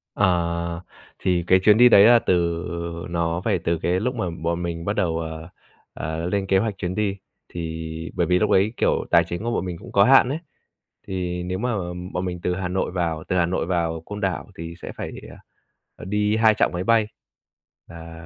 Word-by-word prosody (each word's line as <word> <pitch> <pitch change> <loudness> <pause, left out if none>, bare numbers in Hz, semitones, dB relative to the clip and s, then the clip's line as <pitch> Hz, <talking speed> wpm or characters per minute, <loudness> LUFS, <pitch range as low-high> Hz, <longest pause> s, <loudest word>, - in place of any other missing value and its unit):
À, 85 -3 0 0.4
thì 90 -2 +1
cái 95 - +5
chuyến 105 +1 +6
đi 125 +1 +8
đấy 100 - +8
là 120 +1 +7
từ 85 -3 0 0.4
nó 85 0 -1
phải - - +1
từ 85 0 -1
cái 90 +3 0
lúc 125 +5 -2
mà 110 -6 -2
bọn 85 +1 -3
mình 85 -1 -4
bắt 100 - 0
đầu, 85 -5 0
ờ, 80 0 -6 0.4
ờ, 80 +4 -4
lên 100 0 -1
kế 95 - +3
hoạch 100 0 -1
chuyến 90 -2 -3
đi, 100 -1 -1 0.3
thì 80 -1 -6
bởi 85 - +1
vì 90 +1 +3
lúc - - +1
đấy, 100 +4 +3
kiểu, - - +1
tài 85 -1 +6
chính 85 +4 -5
của 120 - -1
bọn 95 - -1
mình 90 -2 -5
cũng 95 - -12
có 100 - +5
hạn 130 +1 +6
ấy. 145 +4 -2 0.7
Thì 90 -2 -3
nếu 90 +1 -3
mà 125 +2 -1 0.4
bọn 90 - -2
mình 90 -1 -4
từ 90 - 0
Hà 95 0 -3
Nội 95 +1 -1
vào 85 -3 -2
từ 90 - -1
Hà 90 - +3
Nội 90 -1 -1
vào 85 -2 -1
Côn 105 0 -7
Đảo 95 -3 -2
thì 85 0 -7
sẽ - - -6
phải - - -5
đi, - - -10
à, - - -12 0.6
ờ, - - -10
đi 105 +2 +1
2 110 -1 +5
chặng - - +2
máy 90 +1 -2
bay. 115 +1 +3 0.8
À, 85 0 -11
90 Hz, 220 wpm, -23 LUFS, 85-100 Hz, 0.8 s, đi